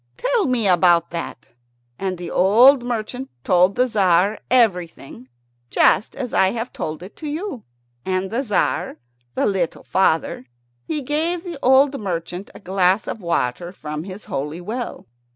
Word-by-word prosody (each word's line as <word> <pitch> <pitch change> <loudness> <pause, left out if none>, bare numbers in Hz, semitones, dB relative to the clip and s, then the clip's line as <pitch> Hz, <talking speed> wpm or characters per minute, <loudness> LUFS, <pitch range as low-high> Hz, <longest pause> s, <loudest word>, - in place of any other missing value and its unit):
Tell - - +1
me 240 -5 +1
about 175 -2 +4
that." 170 -8 -6 0.5
And 190 -2 -2
the 175 -1 -7
old 240 +9 +6
merchant 245 +2 -4
told 180 +2 +3
the 250 - +3
Tzar 200 -3 +2
everything, 175 - 0 0.4
just 210 - +3
as 255 -4 -5
I 190 - +4
have 235 +1 -5
told 155 +2 -5
it 190 - -11
to 310 - -7
you. 300 - -5 0.4
And 185 +1 -2
the 235 +4 0
Tzar, 210 -8 -1 0.4
the - - +1
little 185 -5 -1
father, 160 -7 0 0.4
he 300 -3 -2
gave 325 +5 -1
the 345 -5 -7
old 270 +2 +4
merchant 180 0 -4
a - - -10
glass 190 0 +1
of 220 - -5
water 170 -1 -1
from 150 -4 -6
his 195 +2 -9
holy 150 +4 -4
well. 230 +7 -5
195 Hz, 150 wpm, -21 LUFS, 175-250 Hz, 0.5 s, old